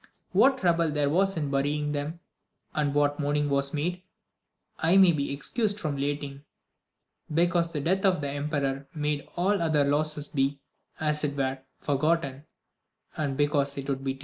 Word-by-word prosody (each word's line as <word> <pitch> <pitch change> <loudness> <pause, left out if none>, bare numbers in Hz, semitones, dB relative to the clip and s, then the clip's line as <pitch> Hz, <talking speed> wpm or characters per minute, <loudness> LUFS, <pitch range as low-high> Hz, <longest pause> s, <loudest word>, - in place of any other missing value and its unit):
What 270 0 +5
trouble 170 -4 +2
there 145 -1 +1
was 195 +2 +2
in 145 -3 -2
burying 145 +2 0
them, 150 +4 -4 0.5
and 150 -2 0
what 145 0 +2
mourning 145 0 0
was 140 0 +1
made, 175 +4 -2 0.8
I 170 +4 +4
may 190 -2 +7
be 140 -4 -2
excused 205 - -1
from 155 -6 -2
relating, 140 0 -3 0.9
because 170 +1 +2
the 150 - -3
death 190 +6 +1
of 190 -4 +3
the 145 -1 -2
em 145 +1 -3
peror 140 -2 -2
made 150 -1 -2
all 195 +3 +1
other 155 -3 +3
losses 150 +1 0
be, 140 0 0 0.4
as 150 -1 0
it 140 -1 -1
were, 135 -1 -1 0.2
forgotten, 145 -1 0 0.7
and 140 -3 -2
because 145 -1 +1
it 140 0 -5
would 135 -1 -2
be 135 -1 -1
tedious. - - -18
150 Hz, 170 wpm, -27 LUFS, 140-165 Hz, 0.9 s, may